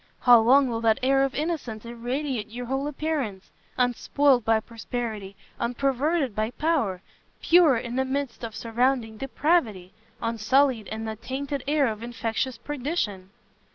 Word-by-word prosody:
How 245 -2 +8
long 260 +5 +5
will 230 -2 -2
that 225 -1 +3
air 270 +1 +4
of 275 -1 -1
innocence 290 -9 -3
irradiate 240 0 -3
your 245 +2 -6
whole 270 +3 -2
appearance? 280 -10 -3 0.3
unspoilt 250 +1 +2
by 225 0 +3
prosperity, 220 -3 -5 0.2
unperverted 270 +3 0
by 215 +1 0
power! 245 - -1 0.4
pure 330 -7 +5
in 240 +2 -4
the 265 - +2
midst 265 -2 -3
of 225 -2 -5
surrounding 235 -1 0
depravity! 250 - 0 0.3
unsullied 230 +1 +1
in 220 +1 -5
the 220 0 -4
tainted 275 +3 -4
air 295 -1 +3
of 220 -3 -3
infectious 235 +2 -3
perdition!" 250 - -3
245 Hz, 140 wpm, -26 LUFS, 225-275 Hz, 0.4 s, How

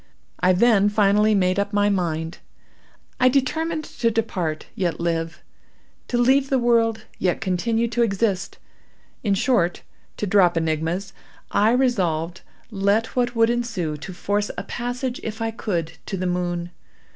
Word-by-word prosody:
I 180 +1 +4
then 205 0 +4
finally 210 +1 +3
made 185 0 +2
up 200 +1 -2
my 205 0 +3
mind. 165 -4 -1 0.8
I 255 - +5
determined 310 +5 0
to 240 -5 -1
depart, 185 -9 -2
yet 175 -4 -2
live—to 165 +7 -5
leave 265 +3 +3
the 270 - +3
world, 230 -3 +2
yet 180 -2 +1
continue 225 +4 0
to 240 +1 0
exist—in 200 0 -3
short, 190 -6 +1 0.3
to - - -2
drop 180 -3 +4
enigmas, 165 +4 -1 0.4
I 210 +2 +3
resolved, 180 -10 0 0.3
let 200 +2 +1
what 245 -1 0
would 230 0 +4
ensue, 225 -10 -2
to 150 - -8
force 205 +3 -1
a 180 - -3
passage, 245 +3 -4
if 220 0 -5
I 225 0 -1
could, 175 -8 -3 0.2
to 195 - -3
the 185 - -2
moon. 175 -1 -2
205 Hz, 140 wpm, -23 LUFS, 180-235 Hz, 0.8 s, I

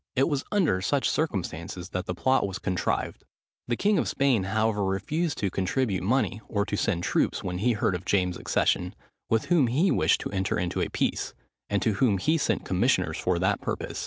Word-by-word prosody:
It 135 - +3
was 145 -3 -1
under 170 - +2
such 140 +7 +1
circumstances 90 - -3
that 90 0 -4
the 90 - -2
plot 130 +1 +2
was 95 0 -5
contrived. 95 -1 -2 0.4
The 120 - 0
king 205 - +2
of - - 0
Spain, 130 -8 +2
however, 110 +1 +1
refused 145 - -1
to 100 -3 -1
contribute 95 +1 0
money 110 0 0
or 100 -2 0
to 105 - -2
send 95 -4 0
troops - - 0
when 90 0 -3
he 120 +4 +2
heard 105 -2 0
of 90 0 -4
James's 90 -2 0
accession, 90 +1 0 0.3
with 115 -1 +2
whom 165 -7 +3
he 155 +11 +2
wished - - +3
to - - -5
enter 95 -1 -1
into 85 0 -1
a - - -1
peace, - - -1 0.3
and 100 -2 0
to 110 - +2
whom 100 -1 +2
he 155 - +1
sent 110 -7 0
commissioners 90 -5 +1
for 90 -1 +1
that 95 +3 +1
purpose. - - -4
100 Hz, 200 wpm, -27 LUFS, 95-130 Hz, 0.4 s, It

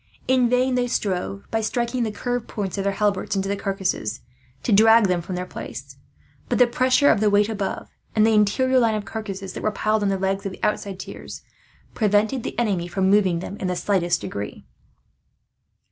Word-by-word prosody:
In 255 -2 +3
vain 250 +1 +2
they 250 0 +1
strove, 195 -3 -2
by 225 - 0
striking 235 +3 -1
the 225 -2 0
curved 245 +2 -3
points 200 -4 -4
of - - -1
their 200 - +1
halberts 205 -1 0
into 195 0 -1
the 200 - 0
carcasses, 190 - -2 0.4
to - - -1
drag 225 +2 +6
them 180 -2 0
from 180 +2 -5
their 180 0 -3
place; - - -8 0.5
but - - +1
the 250 - +7
pressure 255 +4 +3
of - - +2
the 215 0 +3
weight 205 0 +3
above, 205 -3 -3 0.3
and 215 -1 +5
of 225 - +4
the - - +3
interior 255 +5 +3
line 225 -3 +2
of 210 -1 -3
carcasses 195 -3 -6
that - - -6
were 215 - +1
piled 215 0 0
on 200 - +1
the 195 - 0
legs 195 +1 -1
of 195 - -4
the - - -13
outside 200 -2 -1
tiers, - - -9 0.5
prevented 215 +4 +2
the - - -6
enemy 200 -7 0
from 190 +1 +1
moving 190 -5 +3
them 195 - -6
in 190 - -3
the 180 - -1
slightest 175 -2 0
degree. 100 0 -6
205 Hz, 205 wpm, -23 LUFS, 195-225 Hz, 0.5 s, the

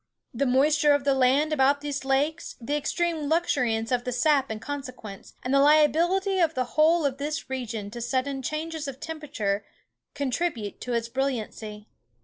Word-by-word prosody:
The 270 +3 0
moisture 290 +3 +4
of 285 -1 +1
the 280 0 +3
land 270 +4 +3
about 285 0 +3
these 285 -2 -3
lakes, 285 +5 0
the 255 +5 -2
extreme 315 0 -1
luxuriance 250 -9 +1
of 245 -1 +1
the 250 - -3
sap 275 +2 +2
in 220 -1 -4
consequence, 255 -7 -8
and 255 - -1
the 275 - +5
liability 335 +7 +4
of 325 -2 +2
the 255 - +1
whole 320 +1 +4
of 275 -1 -1
this 300 -1 -4
region 230 -5 -4
to 240 +1 -7
sudden 265 +3 -1
changes 310 +2 -4
of 270 -1 -7
temperature, 275 -12 -3 0.5
contribute 275 -5 -2
to 250 - -3
its 230 -1 0
brilliancy. 225 -4 -4
275 Hz, 165 wpm, -26 LUFS, 245-305 Hz, 0.5 s, the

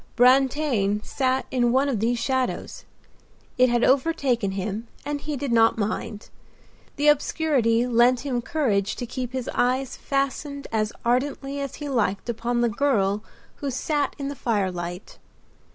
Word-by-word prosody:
Brantain 250 -4 +3
sat 260 -1 0
in 245 -2 +2
one 265 +3 +3
of 255 -7 0
these 235 +3 +1
shadows; 260 +1 -2 0.7
it 255 0 +6
had 240 0 +2
overtaken 260 -7 +2
him 200 +4 -4 0.2
and 290 0 -3
he 295 -1 -3
did 275 -1 -3
not 225 -1 +4
mind. 215 0 -4 0.6
The 295 - +1
obscurity 275 -6 +2
lent 245 0 +4
him 255 -4 -2
courage 220 - 0
to 245 - -4
keep 250 0 -5
his 260 -2 -4
eyes 255 +1 0
fastened 280 +1 -2
as 215 -1 0
ardently 275 +3 0
as 275 -2 -4
he 295 - -6
liked 225 -5 -1
upon 240 +1 -1
the 240 - +3
girl 210 -5 +1 0.3
who 285 - -3
sat 290 +3 -1
in 275 - -4
the 285 - -4
firelight. 185 -6 -3
250 Hz, 150 wpm, -24 LUFS, 225-275 Hz, 0.7 s, it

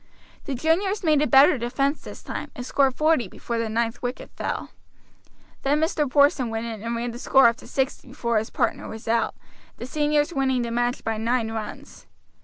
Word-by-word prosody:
The 275 - -3
juniors 375 - +1
made 305 -3 +3
a 300 - +2
better 270 -1 +6
defense 275 +5 -1
this - - -10
time - - -5
and 245 - -6
scored 270 -1 +2
forty 310 -7 +2
before 230 +5 -4
the 230 -1 -1
ninth 230 +1 -1
wicket 245 +1 -5
fell. - - -4 0.9
Then 285 +2 +2
Mr. 310 -3 0
Porson 280 -3 +3
went 225 +1 -3
in 225 -3 -6
and 230 +1 -3
ran 235 +1 -2
the 235 - -8
score 270 0 +5
up 230 +1 +1
to - - -13
sixty 265 0 -2
before 235 -3 0
his 220 - -5
partner 235 - -1
was 220 +1 -9
out, 230 0 +1 0.4
the - - -6
seniors 295 +3 +1
winning 265 -3 +1
the 235 - -4
match 240 +1 -1
by 225 -1 -1
nine 230 0 0
runs. 210 - -7
250 Hz, 200 wpm, -24 LUFS, 230-285 Hz, 0.9 s, better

